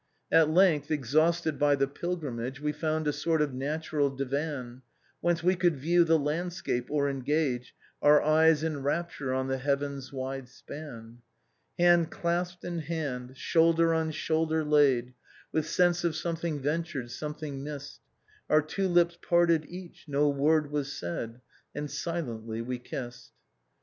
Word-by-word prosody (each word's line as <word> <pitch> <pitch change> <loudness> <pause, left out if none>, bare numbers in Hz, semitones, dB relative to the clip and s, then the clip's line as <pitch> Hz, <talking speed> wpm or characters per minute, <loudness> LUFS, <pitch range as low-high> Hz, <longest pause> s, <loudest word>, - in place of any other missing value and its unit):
313 165 - +7
"At 155 +1 +1
length, 180 -6 +4
exhausted 155 +3 +1
by 145 -1 +4
the 135 0 +1
pilgrimage, 135 -5 -4
We 150 0 -1
found 155 0 -1
a 150 - +1
sort 160 +2 0
of 150 -3 0
natural 145 +2 -1
divan, 135 -2 -4 0.4
Whence 175 -1 +1
wc 180 0 +2
could 170 -4 +3
view 170 +6 +3
the 165 -1 +4
landscape, 155 -4 -2
or 145 -1 +1
engage 135 -2 -1 0.3
Our 150 0 +7
eyes 155 0 +4
in 155 -3 -2
rapture 145 -2 -2
on 130 0 -1
the 135 0 -1
heaven's 140 -1 -2
wide 135 -1 -5
span. 120 -4 -10 0.3
" - - -46
Hand 175 -1 +5
clasped 175 +1 -2
in 175 -1 -3
hand, 140 -5 -4
shoulder 165 +2 +3
on 160 -1 0
shoulder 160 +1 0
laid, 135 -5 +3 0.4
With 155 -1 0
sense 175 -1 +2
of 170 -2 0
something 165 -2 -2
ventured, 145 -4 -2
something 150 -2 -5
misBed, 145 -1 -7 0.5
Our 155 0 +5
two 190 +5 -1
lips 175 -1 +3
parted, 170 -3 +3
each; 180 0 -10
no 145 0 +2
word 145 +1 +2
was 145 -2 -2
said, 115 +7 -5 0.3
And 150 0 -4
silently 115 -9 -4
we 125 +1 -4
kissed. 125 -1 -8
150 Hz, 150 wpm, -29 LUFS, 135-165 Hz, 0.5 s, 313